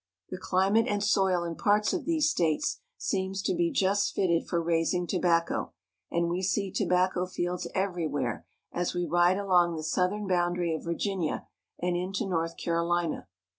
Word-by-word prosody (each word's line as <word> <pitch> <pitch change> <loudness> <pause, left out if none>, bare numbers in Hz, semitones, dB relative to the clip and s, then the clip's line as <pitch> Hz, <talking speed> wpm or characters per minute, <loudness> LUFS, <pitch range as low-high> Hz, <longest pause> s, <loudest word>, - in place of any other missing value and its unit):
The 185 - -4
Tobacco - - -14
Field. - - -11
climate 195 +5 +3
and 205 -3 0
soil 190 -3 +2
in 170 -1 -4
parts 210 +3 +2
of 355 -6 -2
these 320 -2 +2
states 165 - 0 0.2
seem 190 -1 -2
to 190 -1 -1
be 170 -1 +1
just 195 +1 +1
fitted 170 -3 +1
for 170 - 0
raising 170 +1 +1
tobacco, 170 - 0 0.4
and 170 0 0
we 175 +2 -1
see 195 +1 0
tobacco 180 0 +1
fields 175 -1 -3
every 180 -4 0
where 140 -4 -3 0.2
as 175 0 -2
we 175 0 0
ride 175 +2 +3
along 180 -4 +3
the 155 - -5
southern 185 +6 0
boundary 175 -2 +1
of 160 - -5
Virginia 170 0 -2 0.3
and 175 0 -1
into 190 +5 -2
North 165 -3 -1
CaroHna. 170 0 -1
180 Hz, 170 wpm, -28 LUFS, 170-195 Hz, 0.4 s, climate